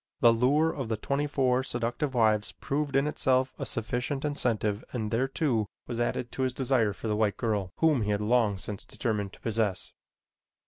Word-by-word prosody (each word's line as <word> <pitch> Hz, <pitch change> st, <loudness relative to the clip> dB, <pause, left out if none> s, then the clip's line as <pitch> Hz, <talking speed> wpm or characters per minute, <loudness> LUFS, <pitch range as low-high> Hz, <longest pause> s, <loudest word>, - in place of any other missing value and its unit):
The 115 Hz, -1 st, +7 dB
lure 145 Hz, +7 st, +3 dB
of 135 Hz, -6 st, -4 dB
the 110 Hz, -, 0 dB
twenty 140 Hz, +6 st, -1 dB
four 130 Hz, -3 st, +2 dB
seductive 125 Hz, +3 st, -2 dB
wives 110 Hz, -3 st, +2 dB
proved 140 Hz, -1 st, -2 dB
in 135 Hz, +1 st, +4 dB
itself 130 Hz, -3 st, +1 dB
a -, -, -3 dB
sufficient 125 Hz, +5 st, -2 dB
incentive 115 Hz, -7 st, 0 dB
and 110 Hz, -4 st, -2 dB
there, 125 Hz, +4 st, +1 dB
too, 130 Hz, -6 st, 0 dB, 0.2 s
was 120 Hz, -1 st, -4 dB
added 120 Hz, 0 st, -1 dB
his 130 Hz, -1 st, 0 dB
desire 125 Hz, -5 st, +2 dB
for 100 Hz, -, -6 dB
the 105 Hz, -, +1 dB
white 105 Hz, -2 st, +1 dB
girl 105 Hz, -5 st, -1 dB
whom 155 Hz, -6 st, +3 dB
he 105 Hz, -, -1 dB
had 105 Hz, -1 st, +1 dB
long 105 Hz, -2 st, +2 dB
since 100 Hz, +1 st, -5 dB
determined 105 Hz, -5 st, -2 dB
to -, -, -14 dB
possess. 110 Hz, -4 st, -1 dB
120 Hz, 185 wpm, -28 LUFS, 110-135 Hz, 0.2 s, The